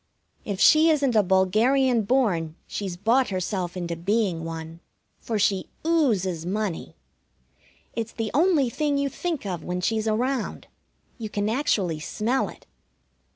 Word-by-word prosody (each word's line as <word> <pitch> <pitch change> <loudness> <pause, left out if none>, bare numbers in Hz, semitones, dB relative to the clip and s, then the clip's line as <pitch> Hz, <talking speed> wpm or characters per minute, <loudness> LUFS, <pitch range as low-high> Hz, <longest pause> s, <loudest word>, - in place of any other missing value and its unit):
If 200 -2 -3
she 315 +1 +6
isn't 280 -6 +2
a 215 - +6
bulgarian 220 +7 +3
born, 200 -9 +1
she's 190 -4 -5
bought 235 +7 +2
herself 185 -1 -3
into 170 -1 -3
being 185 -1 0
one, 165 0 -7 0.4
for 225 - -3
she 195 -2 +1 0.2
oozes 210 - +1
money. 185 - -3 1.0
It's 225 0 -3
the 225 -2 -3
only 310 -2 +3
thing 290 +4 0
you 280 0 0
think 330 -4 -4
of 180 -4 -4
when 180 0 -3
she's 220 +4 0
around. 245 +2 -1 0.5
You 220 -2 -5
can 205 0 -1
actually 200 - 0
smell 230 +11 -1
it. - - -14
215 Hz, 140 wpm, -25 LUFS, 180-260 Hz, 1.0 s, she